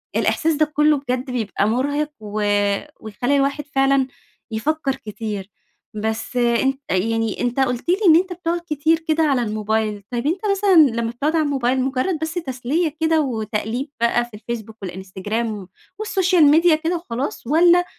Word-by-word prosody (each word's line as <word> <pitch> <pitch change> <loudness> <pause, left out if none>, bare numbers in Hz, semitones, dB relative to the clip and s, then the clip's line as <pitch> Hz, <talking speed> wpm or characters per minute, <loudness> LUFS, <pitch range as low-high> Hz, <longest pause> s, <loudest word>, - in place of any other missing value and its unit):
الإحساس 325 0 +1
ده 310 +1 +3
كله 300 0 +4
بجد 255 -1 -3
بيبقى 215 -4 -1
مرهق 285 +6 0
و 215 0 -5 0.6
ويخلّي 245 +6 -1
الواحد 280 +1 0
فعلًا 270 -1 +3 0.4
يفكر 275 +4 -1
كتير، 210 -4 -6 0.4
بس 220 +3 -3
أنت 245 +3 +2
يعني 225 +3 0
أنت 245 +2 -1
قُلت 250 +4 0
لي 360 - +5
إن 320 - +8
أنت 365 +1 +2
بتقعد 345 0 -2
كتير 315 +2 +2
كده 320 +1 +2
على 275 -5 +2
الموبايل، 215 -1 -1
طيب 240 +3 -2
أنت 350 +4 0
مثلًا 395 -1 +3 0.3
لما 230 - -2
بتقعد 290 +7 -1
على 320 - +3
الموبايل 260 -2 +1
مُجرد 270 +6 -1
بس 320 +1 -3
تسلية 305 +1 -2
كده 320 -1 +3
وتقليب 230 +1 -3
بقى 240 +1 +2
في 240 - -20
الفيسبوك 220 0 -7
والإنستجرام 195 +3 -4 0.3
والسوشيال 375 -5 +2
ميديا 330 +1 +5
كده 325 +3 -1
وخلاص، 265 -5 -5
والّا 345 +5 +5
265 Hz, 155 wpm, -21 LUFS, 225-315 Hz, 0.6 s, إن